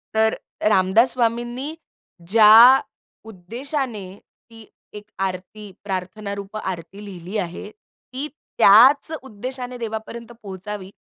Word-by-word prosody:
तर 220 Hz, 0 st, +3 dB, 0.4 s
रामदास 210 Hz, +5 st, +3 dB
स्वामींनी 240 Hz, +4 st, -2 dB, 0.5 s
ज्या 225 Hz, +5 st, +8 dB, 0.5 s
उद्देशाने 235 Hz, -, -5 dB, 0.5 s
ती 225 Hz, -1 st, -14 dB, 0.3 s
एक 210 Hz, 0 st, -9 dB, 0.2 s
आरती 195 Hz, +2 st, -5 dB
प्रार्थना 200 Hz, +1 st, -5 dB
रूप 200 Hz, +1 st, -8 dB
आरती 190 Hz, +1 st, -7 dB
लिहिली 185 Hz, +1 st, -7 dB
आहे, 180 Hz, +1 st, -5 dB
ती 255 Hz, +6 st, -10 dB, 0.3 s
त्याच 255 Hz, +10 st, +6 dB
उद्देशाने 250 Hz, +1 st, -7 dB
देवापर्यंत 230 Hz, +1 st, -7 dB
पोहोचावी 195 Hz, 0 st, -7 dB
215 Hz, 100 wpm, -21 LUFS, 195-240 Hz, 0.5 s, ज्या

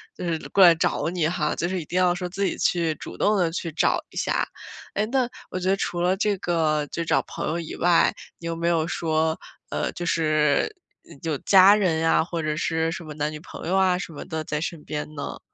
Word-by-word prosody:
就 -, -, -7 dB
是 170 Hz, -2 st, 0 dB
过 195 Hz, -, +5 dB
来 170 Hz, -2 st, +8 dB
找 160 Hz, -1 st, 0 dB
你 170 Hz, -3 st, 0 dB
哈， 160 Hz, -3 st, -1 dB
就 175 Hz, -, -1 dB
是 185 Hz, -1 st, -2 dB
一 -, -, -9 dB
定 175 Hz, -, -3 dB
要 180 Hz, -1 st, +4 dB
说 180 Hz, 0 st, -4 dB
自 195 Hz, +2 st, -1 dB
己 -, -, -1 dB
去 165 Hz, -3 st, +1 dB
主 -, -, -9 dB
动 210 Hz, -, +3 dB
地 175 Hz, -3 st, +1 dB
去 165 Hz, 0 st, -4 dB
找 155 Hz, -, +2 dB
一 -, -, -17 dB
下。 -, -, 0 dB, 0.5 s
哎， 205 Hz, -, 0 dB
那 255 Hz, +1 st, +1 dB, 0.2 s
我 185 Hz, -, -3 dB
觉 185 Hz, -, -3 dB
得 195 Hz, -, +4 dB
除 175 Hz, -3 st, -3 dB
了 180 Hz, +2 st, +2 dB
这 205 Hz, 0 st, 0 dB
个 155 Hz, -4 st, 0 dB
就 170 Hz, -, -2 dB
找 165 Hz, -, +2 dB
朋 -, -, -5 dB
友 165 Hz, +2 st, -1 dB
以 165 Hz, -, -6 dB
外， 175 Hz, 0 st, +3 dB, 0.2 s
你 170 Hz, -, -11 dB
有 165 Hz, 0 st, -2 dB
没 170 Hz, +1 st, -2 dB
有 165 Hz, -1 st, +2 dB
说， 160 Hz, -3 st, 0 dB, 0.4 s
呃， -, -, -1 dB
就 175 Hz, -, -5 dB
是 155 Hz, -, +2 dB, 0.5 s
有 160 Hz, -2 st, -1 dB
家 195 Hz, +1 st, +7 dB
人 185 Hz, -6 st, +1 dB
呀， 165 Hz, 0 st, +3 dB
或 170 Hz, 0 st, -4 dB
者 155 Hz, 0 st, -1 dB
是 160 Hz, 0 st, 0 dB
什 175 Hz, -, -6 dB
么 155 Hz, -2 st, -9 dB
男 150 Hz, +1 st, -1 dB
女 155 Hz, -, -7 dB
朋 160 Hz, -, -9 dB
友 185 Hz, -, +1 dB
啊 190 Hz, -2 st, +3 dB
什 175 Hz, -2 st, -6 dB
么 145 Hz, -, -7 dB
的 160 Hz, -1 st, -4 dB
在 150 Hz, 0 st, -3 dB
身 165 Hz, -2 st, -4 dB
边 150 Hz, -1 st, -4 dB
呢？ 140 Hz, -1 st, -5 dB
170 Hz, 260 characters per minute, -24 LUFS, 160-180 Hz, 0.5 s, 来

